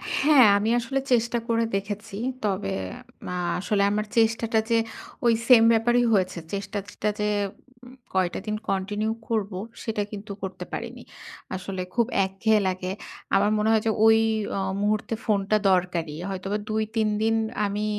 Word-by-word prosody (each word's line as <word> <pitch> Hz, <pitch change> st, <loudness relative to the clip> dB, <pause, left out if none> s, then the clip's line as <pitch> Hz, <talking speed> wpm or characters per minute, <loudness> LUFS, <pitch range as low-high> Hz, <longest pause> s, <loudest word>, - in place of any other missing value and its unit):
হ্যাঁ, 280 Hz, -3 st, +6 dB
আমি 210 Hz, +2 st, 0 dB
আসলে 265 Hz, +3 st, -1 dB
চেষ্টা 235 Hz, 0 st, +2 dB
করে 230 Hz, -1 st, +2 dB
দেখেছি। 205 Hz, +2 st, -4 dB, 0.3 s
তবে 190 Hz, -, -1 dB, 0.6 s
আ -, -, -3 dB, 0.2 s
আসলে 200 Hz, +2 st, 0 dB
আমার 210 Hz, +1 st, 0 dB
চেষ্টাটা 225 Hz, 0 st, +3 dB
যে 230 Hz, -, +4 dB, 0.5 s
ওই 235 Hz, -, +5 dB
সেইম 245 Hz, -3 st, +8 dB
ব্যাপারই 240 Hz, +2 st, +3 dB
হয়েছে। 185 Hz, -3 st, +1 dB, 0.2 s
চেষ্টাটা 200 Hz, 0 st, -3 dB
যে 210 Hz, 0 st, +1 dB, 0.6 s
উ -, -, -12 dB, 0.2 s
কয়টা 185 Hz, -2 st, +1 dB
দিন 215 Hz, -, -1 dB
কন্টিনিউ 205 Hz, +3 st, -1 dB, 0.2 s
করবো, 205 Hz, -4 st, -1 dB, 0.2 s
সেটা 220 Hz, -2 st, -2 dB
কিন্তু 210 Hz, -1 st, -7 dB
করতে 185 Hz, -1 st, -5 dB
পারিনি। -, -, -6 dB, 0.5 s
আসলে 190 Hz, 0 st, -5 dB
খুব 235 Hz, -1 st, +3 dB, 0.2 s
একঘেয়ে 210 Hz, +3 st, +2 dB
লাগে। 185 Hz, 0 st, -2 dB, 0.4 s
আমার 205 Hz, +2 st, +3 dB
মনে 210 Hz, +1 st, +1 dB
হয় 220 Hz, -1 st, +4 dB
যে 225 Hz, -, +3 dB
ওই 225 Hz, 0 st, +7 dB, 0.4 s
আ -, -, 0 dB, 0.2 s
মুহূর্তে 210 Hz, +2 st, 0 dB
ফোনটা 205 Hz, 0 st, +2 dB
দরকারি। 175 Hz, -4 st, 0 dB
হয়তোবা 195 Hz, +2 st, -3 dB
২,৩ 220 Hz, 0 st, 0 dB
দিন 225 Hz, +1 st, +2 dB, 0.3 s
আমি 205 Hz, +1 st, -2 dB
210 Hz, 145 wpm, -25 LUFS, 195-225 Hz, 0.6 s, সেইম